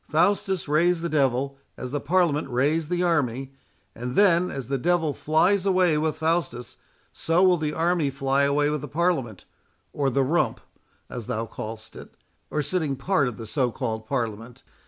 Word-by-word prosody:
Faustus 190 +2 +1
raised 165 +3 +2
the 170 - -1
devil, 135 -2 0 0.2
as 125 - -6
the 145 0 -2
Parliament 160 -3 +1
raised 150 +5 0
the 180 0 0
army, 135 -6 0 0.4
and 125 +2 -5
then, 180 -3 +4
as 135 -4 -6
the 135 0 -1
devil 165 0 +1
flies 175 +7 +2
away 185 -4 +3
with 155 +1 0
Faustus, 160 -7 -2 0.4
so 165 +3 +1
will 185 -1 +5
the 155 -2 -2
army 165 -3 +1
fly 135 0 0
away 145 +1 +2
with 150 -2 -2
the 150 - -6
Parliament, 145 - -1 0.5
or 140 -2 0
the 135 +1 +1
rump, 160 +6 +1 0.5
as 120 -4 -7
thou 115 +1 -2
call'st 110 0 -8
it, - - -12 0.3
or 150 - -1
sitting 155 -3 -1
part 145 +1 +1
of 120 - -5
the 115 - -7
so 125 +2 0
called 110 -2 -4
Parliament. 115 -2 -4
145 Hz, 175 wpm, -25 LUFS, 130-170 Hz, 0.5 s, will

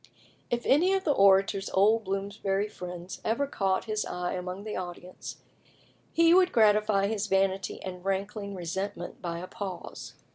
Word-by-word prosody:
If 240 0 -1
any 345 +8 +4
of 385 -1 +1
the 310 - +2
Orator's 195 -3 +4
old 215 +3 +4
Bloomsbury 195 +1 -1
friends 180 -2 -8
ever 235 +6 +1
caught 195 -8 0
his 215 -1 -1
eye 180 0 -3
among 180 +2 -5
the 215 - -5
audience, 180 0 -7 0.7
he 335 0 +5
would 365 0 +5
gratify 210 -2 +4
his 210 0 -1
vanity 195 -1 +1
and 180 -1 -6
rankling 200 +1 -2
resentment 185 +1 -4
by 170 -2 -3
a 175 - -5
pause. 190 -2 -7
195 Hz, 150 wpm, -28 LUFS, 185-215 Hz, 0.7 s, he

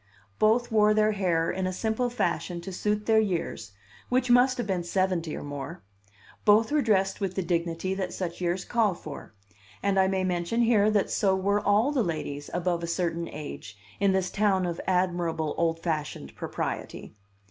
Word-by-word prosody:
Both 230 +3 +3
wore 215 -1 +4
their 215 0 +3
hair 175 -5 +1
in 190 0 -2
a - - -1
simple 220 +6 -1
fashion 175 -6 -2
to 190 +2 -7
suit 210 +3 -1
their 220 -1 +4
years, 170 - -2 0.4
which 250 0 +2
must 250 +1 +5
have 240 - -2
been 185 -3 -1
seventy 175 -2 0
or - - -6
more; 145 -7 -7 0.6
both 215 +3 +5
were 300 0 +3
dressed 195 -4 +1
with 190 -2 -2
the 190 - -1
dignity 170 +1 -1
that 190 -1 -3
such 175 -1 -5
years 180 +1 -1
call 220 -6 +1
for; 145 -8 -10 0.5
and 195 -1 +2
I 190 - +4
may 190 0 0
mention 180 +6 0
here 215 -3 +4
that 210 -2 +1
so 195 -2 +2
were 200 +2 +1
all 210 +7 +3
the 280 -4 +1
ladies 150 -4 -4
above 175 -1 -1
a 170 - -3
certain 170 -1 -1
age 140 -8 -8 0.2
in 200 0 +3
this 190 -1 0
town 195 -3 +2
of 170 -1 -3
admirable 175 -4 0
old 165 0 0
fashioned 150 - -3
propriety. - - -5
190 Hz, 180 wpm, -27 LUFS, 170-210 Hz, 0.6 s, must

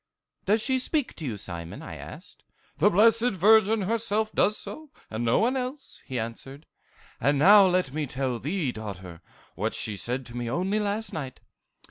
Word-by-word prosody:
"'Does 215 +3 +2
she 260 -1 +2
speak 290 +1 -1
to - - -8
you, 110 -4 -4
Simon?' 85 -3 -7
I - - -8
asked. - - -11 0.4
"'The 195 +7 +5
Blessed 225 +4 +4
Virgin 215 +3 +4
herself 220 +1 0
does 210 - +2
so, 310 -1 -7 0.2
and 110 +2 -3
no 115 0 +2
one 245 +4 +2
else,' 260 +2 -5
he 130 - -4
answered. 135 +6 -6 0.5
'And 145 +4 +2
now 195 +6 +7
let 180 -7 0
me 150 -1 -2
tell 130 -2 -2
thee, 150 -1 -2
daughter, 95 -6 -8 0.3
what - - -3
she 105 - -1
said 125 +6 -3
to 120 - -10
me 120 -1 -3
only 185 - 0
last 210 +1 -3
night. 135 -5 -6
180 Hz, 175 wpm, -26 LUFS, -, 0.5 s, now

